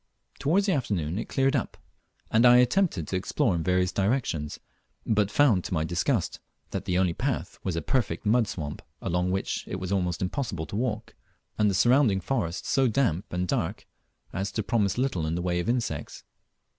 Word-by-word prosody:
Towards 185 +8 +2
the 200 - +2
afternoon 95 - -1
it - - -5
cleared 135 0 +2
up, - - -2 0.5
and 110 +1 +4
I 125 0 +8
attempted 125 - +2
to - - -3
explore 95 +1 +1
in 85 - -1
various 90 +1 +1
directions, 95 - -1 0.5
but 105 -2 +2
found 105 -6 +4
to - - -2
my 80 - +1
disgust 85 +1 0 0.3
that - - -4
the 90 - 0
only 90 -2 +2
path 120 -3 -3
was 95 -3 -2
a 85 - -2
perfect 125 - -1
mud 115 +1 +3
swamp, 75 -7 -5 0.2
along 90 +1 0
which 95 +1 -2
it - - -4
was 95 0 -4
almost 90 -3 0
impossible 95 - -2
to - - -7
walk, 115 -1 -2 0.5
and 105 -1 +4
the 100 - 0
surrounding 120 0 +4
forest 95 -5 -2
so 135 -1 +3
damp 105 - 0
and 90 +1 -1
dark - - -2 0.5
as 95 +1 -2
to 110 - -1
promise 100 -2 +1
little 125 -12 0
in 80 - -1
the 85 - -2
way 90 -1 0
of 90 - -2
insects. 110 - -2
100 Hz, 190 wpm, -27 LUFS, 90-120 Hz, 0.5 s, I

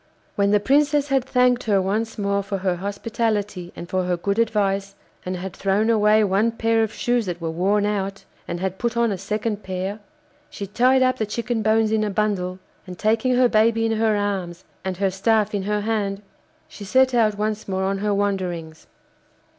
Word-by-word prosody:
When 200 0 +2
the 205 0 +4
Princess 290 +4 +2
had 270 -2 +2
thanked 250 -1 +2
her 205 -3 +3
once 215 +4 -2
more 200 -1 0
for 200 0 -4
her 185 -2 -1
hospitality 205 -2 -2
and 175 - -8
for 185 0 -1
her 180 -1 0
good 200 +5 -1
advice, 200 -3 0 0.3
and 185 - -2
had 185 +1 -6
thrown 205 +3 +1
away 215 0 +4
one 205 +3 +2
pair 225 0 +1
of 220 -1 0
shoes 240 -3 0
that 175 -1 -4
were 165 -1 -3
worn 200 +5 +1
out, 195 -1 -2 0.2
and 170 - -4
had 190 0 -3
put 235 -1 -1
on 235 -2 +2
a 195 - -2
second 210 +1 -2
pair, 190 +2 -4 0.5
she 200 - -6
tied 255 +6 +3
up 255 0 +2
the 220 - -1
chicken 235 +1 -2
bones 220 0 +2
in 220 -1 +2
a 210 - -1
bundle, 195 -3 -1 0.3
and 180 -1 -8
taking 225 +5 +1
her 250 0 +5
baby 225 0 +3
in 225 - +1
her 220 -1 +2
arms 190 -4 -3 0.2
and 190 -1 -3
her 195 0 +1
staff 215 +2 +1
in 205 - 0
her 210 +2 -1
hand, 205 -2 -2 0.4
she 205 - -11
set 260 +6 +3
out 215 -4 +2
once 215 0 -2
more 190 -1 -1
on 195 0 -1
her 210 +1 0
wanderings. 185 -6 -2
205 Hz, 200 wpm, -22 LUFS, 195-225 Hz, 0.5 s, her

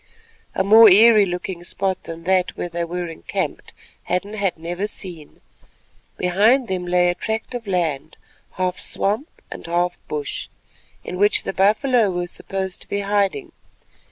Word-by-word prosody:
A 190 - +1
more 220 +3 +8
eerie 210 +1 +7
looking 180 0 -5
spot 190 +1 -2
than 165 0 -8
that 185 0 +1
where 175 - -3
they 170 0 -3
were 175 +1 -4
encamped 165 -1 -5 0.3
Hadden 200 +3 -2
had 200 -5 -1
never 175 +5 -4
seen. 175 -7 -7 0.8
Behind 215 +8 +3
them 185 -2 -3
lay 180 0 +3
a - - +1
tract 220 +6 -4
of 240 -3 -6
land—half 180 +2 -4
swamp 215 - -1 0.2
and - - -8
half 175 +1 0
bush—in 150 +4 -7
which 205 0 +3
the - - -4
buffalo 215 +4 +3
were 175 -1 -2
supposed 190 +1 -5
to - - -14
be 200 - -1
hiding. 200 - 0
185 Hz, 145 wpm, -21 LUFS, 175-205 Hz, 0.8 s, more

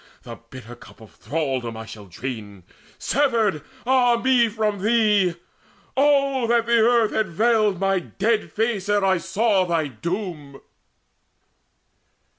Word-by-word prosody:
The 115 -1 -9
bitter 120 -2 -11
cup - - -17
of 110 -2 -15
thraldom 135 -7 -3
shall 105 -2 -11
I - - -22
drain, 105 -2 -7 0.3
Severed, 230 - 0 0.2
ah 245 -2 +3
me, 245 -2 +3
from 215 -2 -2
thee! 210 -5 +2 0.6
Oh 275 -3 +2
that 235 0 +2
the 235 0 +3
earth 230 -1 +3
Had 220 -2 0
veiled 215 +1 +1
my 195 -1 +1
dead 215 +5 -2
face 215 -3 -2
ere 205 -1 +2
I 190 -2 +2
saw 205 0 +1
thy 165 -4 -1
doom!" 155 - -6
205 Hz, 130 wpm, -22 LUFS, 155-235 Hz, 0.6 s, ah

